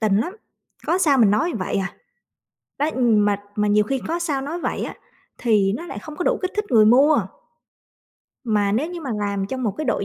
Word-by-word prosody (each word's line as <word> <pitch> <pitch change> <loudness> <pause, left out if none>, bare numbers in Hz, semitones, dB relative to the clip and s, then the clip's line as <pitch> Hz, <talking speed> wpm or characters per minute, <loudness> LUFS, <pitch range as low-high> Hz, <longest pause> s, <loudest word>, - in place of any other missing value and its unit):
tình 215 -3 +2
lắm, 345 - -2 0.5
có 355 - +2
sao 300 -7 +3
mình 220 -5 +5
nói 220 - +1
vậy 185 - -2
à. 195 0 -3 0.8
Đó, 295 +2 +1
mà 210 -4 +3 0.2
mà 210 0 +1
nhiều 210 +1 +4
khi 270 +5 -2
có 335 +1 -1
sao 300 -6 -1
nói 310 +6 -4
vậy - - -3
á - - -6 0.4
thì 210 -5 +2
nó 340 - -8
lại - - -7
không 310 -2 -10
có 355 - -3
đủ - - +2
kích 370 - -2
thích 420 0 -1
người 220 -3 +6
mua. 275 +7 +5 1.3
Mà 210 -3 +1
nếu 280 +10 0
như 350 -1 -6
mà 280 -5 -5
làm 200 -1 -2
trong 255 +4 -4
một 220 - +1
cái 310 - -2
đội 235 -5 0
240 Hz, 220 wpm, -22 LUFS, 210-310 Hz, 1.3 s, người